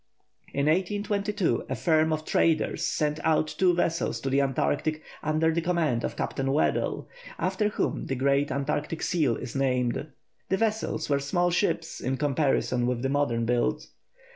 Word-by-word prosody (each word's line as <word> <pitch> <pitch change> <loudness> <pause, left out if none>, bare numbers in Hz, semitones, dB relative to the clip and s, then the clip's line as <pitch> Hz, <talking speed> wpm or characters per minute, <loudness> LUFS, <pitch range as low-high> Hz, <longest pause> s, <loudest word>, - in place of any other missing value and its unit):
In 140 0 0
1822 200 +3 0
a - - -1
firm 160 -2 +2
of 155 0 -2
traders 160 -1 +1
sent 150 0 0
out 160 -1 +3
two 180 -2 +4
vessels 170 -1 0
to 135 - -2
the 140 +1 +3
Antarctic 140 - 0 0.2
under 155 +1 +1
the 170 - 0
command 160 -9 0
of - - -3
Captain 135 0 -2
Weddell, 145 - 0 0.3
after 210 - 0
whom - - -2
the 135 - -1
great 140 +2 +2
Antarctic 145 +3 -2
seal 160 -9 +1
is 125 +3 -7
named. 125 0 0 0.4
The 190 - +2
vessels 220 0 -1
were 140 -1 +2
small 175 +6 +1
ships 170 -2 0
in 130 +2 -1
comparison 135 -4 +1
with 125 -1 -1
the 135 - +1
modern 135 -5 +1
build. 120 +1 0
150 Hz, 160 wpm, -27 LUFS, 135-170 Hz, 0.4 s, two